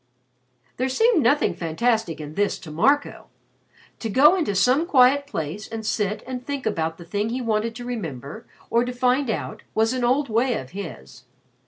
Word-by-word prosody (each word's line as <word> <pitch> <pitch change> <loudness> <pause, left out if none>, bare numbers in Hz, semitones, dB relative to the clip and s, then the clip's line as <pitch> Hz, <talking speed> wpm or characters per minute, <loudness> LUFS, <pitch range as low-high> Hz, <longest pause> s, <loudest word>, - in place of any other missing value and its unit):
There 255 +2 0
seemed 445 - +3
nothing 280 +4 +3
fantastic 180 +2 -1
in 150 0 -7
this 205 +4 0
to 160 - -9
Marco. 275 - +1 0.7
To 225 - -4
go 295 - +6
into 310 - -1
some 255 - +3
quiet 280 -1 +4
place 180 - -5
and 225 -1 -6
sit 210 -1 -1
and 250 0 -5
think 280 0 -4
about 165 -6 -1
the 170 - -11
thing 205 +5 -2
he 245 +3 -2
wanted 225 -1 -1
to 245 0 -7
remember 165 - -6 0.2
or 235 +1 +3
to 250 0 -4
find 250 +2 +1
out 220 - -3
was 225 +2 +2
an 255 -1 -2
old 265 +4 +2
way 235 +2 +1
of 130 +1 -6
his. 165 -9 -9
230 Hz, 180 wpm, -23 LUFS, 200-260 Hz, 0.7 s, go